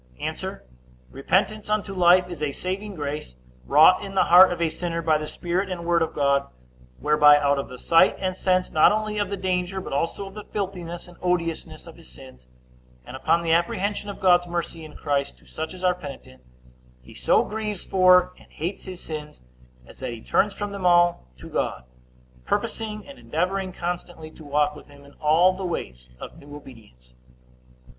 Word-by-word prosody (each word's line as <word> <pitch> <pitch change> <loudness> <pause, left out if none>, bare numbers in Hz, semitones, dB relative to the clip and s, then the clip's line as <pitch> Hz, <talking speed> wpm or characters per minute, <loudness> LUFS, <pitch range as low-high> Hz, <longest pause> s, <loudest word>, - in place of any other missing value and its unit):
A. - - -5 0.5
Repentance 195 +10 0
unto 210 -2 -1
life 180 0 +5
is 175 -4 -8
a 150 -2 -1
saving 195 +4 -5
grace, 145 - -5 0.3
wrought - - +6
in 195 0 -8
the - - +4
heart 180 +2 +7
of 175 - -3
a 170 - +2
sinner 170 +1 -4
by 155 -1 +2
the 155 - -5
Spirit 180 +5 -2
and 175 -2 -5
Word 170 -1 +2
of 160 - -1
God, 140 -1 +2 0.5
whereby, 150 0 +6
out 140 -1 +1
of 140 - -5
the 125 - -9
sight 165 +5 +4
and 185 -1 -2
sense, 185 -1 0
not 155 - +5
only 215 0 -1
of 205 -2 -1
the 200 - -3
danger, 185 0 -2
but 185 - -7
also 165 +7 -2
of 195 - -10
the 210 0 -8
filthiness 180 -5 -5
and 175 - -15
odiousness 170 -2 -2
of - - -13
his - - -15
sins, 65 0 -15 0.6
and - - -9
upon 165 +5 +1
the 165 - 0
apprehension 195 +5 0
of 200 - -7
God's 175 -2 +4
mercy 170 -1 -4
in 155 -1 -12
Christ 140 -1 -2
to - - -24
such 160 0 -6
as 185 0 -10
are 180 -1 +4
penitent, 140 - -11 0.6
he 60 - -14
so - - +2
grieves 210 -3 -4
for 180 -1 +4
and - - -20
hates 175 +5 -5
his 185 -1 -8
sins, 150 -1 -7 0.5
as - - -16
that 130 -2 -4
he 115 - -9
turns 205 -1 +1
from 205 -1 -4
them 200 -2 -6
all 175 - +3
to - - -11
God, 65 - -2 0.6
purposing 215 - -3
and 280 -1 -12
endeavoring 185 +3 -2
constantly 175 -2 -6
to 160 - -14
walk 150 0 0
with 150 - -13
him 140 0 -17
in 140 - -17
all 165 +5 +4
the 190 +1 -7
ways 60 - -5
of - - -10
new 145 0 -12
obedience. 105 - -15
175 Hz, 195 wpm, -24 LUFS, 150-185 Hz, 0.6 s, heart